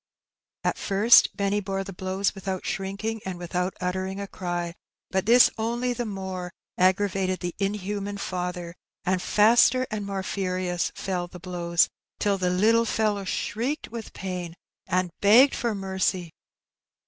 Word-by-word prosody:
At - - 0
first 210 +4 +5
Benny 200 0 +1
bore 195 -1 -3
the 195 0 -8
blows 190 +2 -1
without 190 -1 -4
shrinking 200 +3 -3
and 190 -2 -5
without 180 +1 -2
uttering 190 +1 -2
a 200 - -3
cry; 175 -3 -4 0.4
but 190 +1 0
this 240 +2 +7
only 240 +2 0
the 240 -1 -3
more 190 -3 -5 0.3
aggravated 185 0 +1
the 175 -1 -3
inhuman 200 0 -2
father, 180 -2 -4 0.3
and 185 -1 +1
faster 235 +6 +5
and 215 -1 -2
more 195 -1 -3
furious 185 -2 -1
fell 180 -2 -2
the 180 0 -11
blows, 170 -1 +1 0.3
till 200 -2 +1
the 180 -1 +1
little 220 +6 +3
fellow 210 -3 0
shrieked 240 +10 -2
with 230 -1 -7
pain 180 -3 -5 0.3
and 180 0 0
begged 235 +7 +7
for 235 -3 -1
mercy. 190 -3 -1
195 Hz, 145 wpm, -26 LUFS, 180-205 Hz, 0.4 s, this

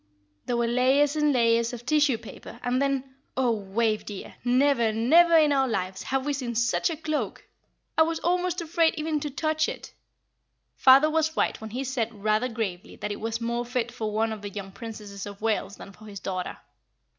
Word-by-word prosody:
"There 240 - 0
were 235 - +2
layers 265 +5 +3
and 300 -1 +3
layers 235 -2 +2
of 240 0 -8
tissue 290 -2 +3
paper, 235 - -11
and 250 +1 +1
then 275 -2 +1 0.3
oh, 255 -2 +3
Wave, 215 +1 0
dear! 205 -2 -8
never, 250 -2 +3
never 325 +10 +5
in 305 -2 +5
all 275 - +3
our 265 - +1
lives 190 -4 -2
have 270 0 -2
we 290 - 0
seen 250 -4 -4
such 235 +8 +1
a 325 - -4
cloak! 310 -1 -3 0.5
I - - +4
was 325 +1 +2
almost 360 0 0
afraid 330 0 +2
even 310 0 -1
to 295 - -4
touch 310 +3 0
it. - - -8 0.8
Father 270 +3 +7
was 315 0 0
right - - 0
when 220 - -6
he 250 +5 -3
said 230 -5 -3
rather 215 +4 +2
gravely 210 -6 -4
that 210 - -4
it 205 - -5
was 225 +1 -3
more 235 +1 -1
fit 240 -1 -2
for 220 -3 -4
one 220 +1 0
of 215 - -8
the 205 - -5
young 200 -1 -7
Princesses 210 -3 -8
of 200 -1 -9
Wales 215 -2 -1
than 195 - -11
for 215 +3 -16
his 200 -2 -8
daughter. 185 -1 -4
240 Hz, 205 wpm, -26 LUFS, 220-290 Hz, 0.8 s, Father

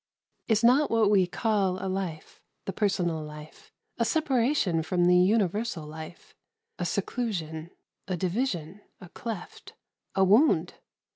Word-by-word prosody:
Is 220 -1 +2
not 265 +5 +5
what 220 -3 +3
we 190 -3 +4
call 195 -2 0
a 190 - -5
life 185 -4 -4 0.2
the 195 - -3
personal 180 -6 0
life 150 - -12 0.3
a - - +3
separation 260 - +1
from 175 +2 +1
the 180 0 +5
universal 195 -1 +1
life, 155 +2 -10 0.5
a - - -1
seclusion, 170 -9 -3 0.4
a 185 -1 -2
division, 185 - -2 0.2
a 180 - -12
cleft, 220 -4 -8 0.4
a 190 - +4
wound? 195 - +4
190 Hz, 130 wpm, -27 LUFS, 170-225 Hz, 0.5 s, not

